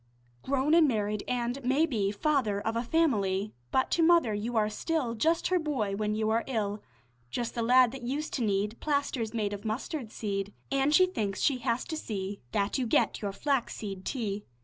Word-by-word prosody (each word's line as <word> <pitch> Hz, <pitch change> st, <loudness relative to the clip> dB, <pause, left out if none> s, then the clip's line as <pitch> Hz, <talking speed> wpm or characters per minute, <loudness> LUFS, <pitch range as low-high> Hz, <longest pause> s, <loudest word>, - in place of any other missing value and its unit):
Grown 275 Hz, +3 st, +1 dB
and 330 Hz, -2 st, +6 dB
married 210 Hz, -4 st, 0 dB
an' 245 Hz, 0 st, -1 dB
maybe 260 Hz, -6 st, +2 dB
Father 220 Hz, -3 st, +1 dB
of 225 Hz, +2 st, -2 dB
a 230 Hz, -, +1 dB
family, 215 Hz, -9 st, +1 dB, 0.2 s
But 260 Hz, -, +1 dB
to 340 Hz, -, +2 dB
mother 330 Hz, -9 st, +5 dB
you 225 Hz, +3 st, -2 dB
are 210 Hz, -1 st, +3 dB
still 255 Hz, +3 st, -1 dB
Just 320 Hz, +9 st, +1 dB
her 365 Hz, -1 st, +3 dB
boy 255 Hz, -11 st, -1 dB
when 210 Hz, +1 st, -1 dB
you 215 Hz, 0 st, 0 dB
are 230 Hz, +1 st, +2 dB
ill; 210 Hz, -5 st, -2 dB, 0.5 s
Just 235 Hz, -, -3 dB
the 235 Hz, -, -2 dB
lad 250 Hz, +1 st, +5 dB
that 270 Hz, 0 st, -8 dB
used 280 Hz, +6 st, -3 dB
to 250 Hz, -, -1 dB
need 205 Hz, +1 st, 0 dB
Plasters 280 Hz, -6 st, -1 dB
made 210 Hz, -2 st, -1 dB
of 200 Hz, 0 st, -6 dB
mustard 225 Hz, +2 st, -4 dB
seed; 200 Hz, -1 st, -3 dB, 0.2 s
An' 275 Hz, +1 st, +2 dB
she 340 Hz, +5 st, +6 dB
thinks 210 Hz, -, -3 dB
she 270 Hz, -3 st, +2 dB
has 240 Hz, 0 st, -1 dB
to 320 Hz, -, -4 dB
see 200 Hz, -8 st, -4 dB
That 200 Hz, +6 st, 0 dB
you 250 Hz, -, 0 dB
get -, -, +2 dB
your 200 Hz, -2 st, -2 dB
flaxseed 210 Hz, -6 st, -2 dB
tea. 210 Hz, -5 st, -3 dB
230 Hz, 195 wpm, -29 LUFS, 210-275 Hz, 0.5 s, and